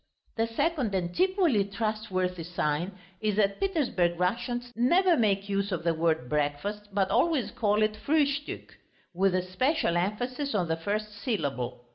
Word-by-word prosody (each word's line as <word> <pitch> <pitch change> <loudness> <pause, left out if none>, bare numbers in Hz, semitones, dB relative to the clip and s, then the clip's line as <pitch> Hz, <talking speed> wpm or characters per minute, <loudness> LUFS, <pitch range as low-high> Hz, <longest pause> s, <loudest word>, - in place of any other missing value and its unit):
The 225 0 +1
second 240 - 0
and 175 - -2
equally 365 - +3
trustworthy 200 -3 -2
sign 170 +1 -1 0.3
is 215 -2 +1
that 200 -1 +2
Petersburg 250 - +1
Russians 240 +6 -1
never 345 - +4
make 200 -5 +1
use 200 0 -1
of 175 -3 -2
the 170 -1 +2
word 160 -5 0
"breakfast," 150 +9 -2
but 195 -1 +1
always 320 -7 +2
call 210 -1 +2
it 215 0 +1
"Frühstück" 285 +5 -1 0.4
with 190 +1 +2
especial 185 - +1
emphasis 245 +8 -2
on 180 -4 0
the 160 - +2
first 210 +5 -3
syllable. 140 - -3
205 Hz, 145 wpm, -28 LUFS, 180-245 Hz, 0.4 s, never